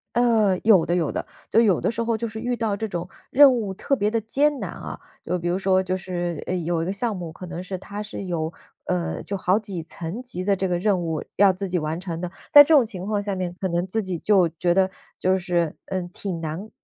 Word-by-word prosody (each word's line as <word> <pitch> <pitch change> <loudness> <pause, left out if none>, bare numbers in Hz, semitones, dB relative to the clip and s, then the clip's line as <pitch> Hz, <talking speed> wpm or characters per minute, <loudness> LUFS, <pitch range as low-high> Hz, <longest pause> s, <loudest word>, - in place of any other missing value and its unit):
呃， 225 -6 +3
有 200 -7 +6
的 175 - 0
有 165 -5 0
的， - - -3 0.2
就 - - +4
有 205 -7 +4
的 - - +1
时 230 - -3
候 230 0 0
就 235 - -3
是 220 -1 -5
遇 245 +1 -1
到 220 -3 -1
这 220 - -2
种 180 -2 -5 0.2
任 275 -1 +8
务 215 -5 -2
特 275 +8 0
别 205 0 +1
得 225 0 0
艰 280 +6 +1
难 - - -3
啊， - - -7 0.3
就 180 - 0
比 175 0 -2
如 180 - +1
说 190 -1 +3
就 185 0 -1
是， 175 -3 -3
呃， 185 - 0
有 170 -1 -1
一 - - -1
个 190 - -2
项 220 +2 -1
目 170 -3 -6
可 185 - -9
能 175 0 -5
是 185 +1 -5
它 205 +3 -7
是 210 -1 -6
有， 165 -4 -2 0.3
呃， 180 -2 -2
就 200 - -4
好 190 +2 +2
几 195 -6 -6
层 170 +7 -6
级 235 -8 -6
的 200 0 +3
这 190 0 -1
个 175 - +1
任 195 -1 +2
务 160 -2 -2
要 200 0 +6
自 190 +1 -4
己 180 - -1
完 155 +2 -3
成 170 -3 -5
的， 180 - -3 0.2
在 290 -1 +12
这 320 - +2
种 275 -6 +6
情 190 -4 -7
况 210 0 0
下 200 -1 -3
面 180 -1 -3
可 190 - -1
能 175 +1 0
自 220 +4 -1
己 185 -4 -3
就 190 -1 +4
觉 175 +1 +2
得 190 +1 +3 0.3
就 185 +1 +2
是， 175 -3 0
嗯， 185 -2 -3
挺 185 -4 -4
难 165 +7 -5
190 Hz, 280 characters per minute, -24 LUFS, 175-215 Hz, 0.3 s, 在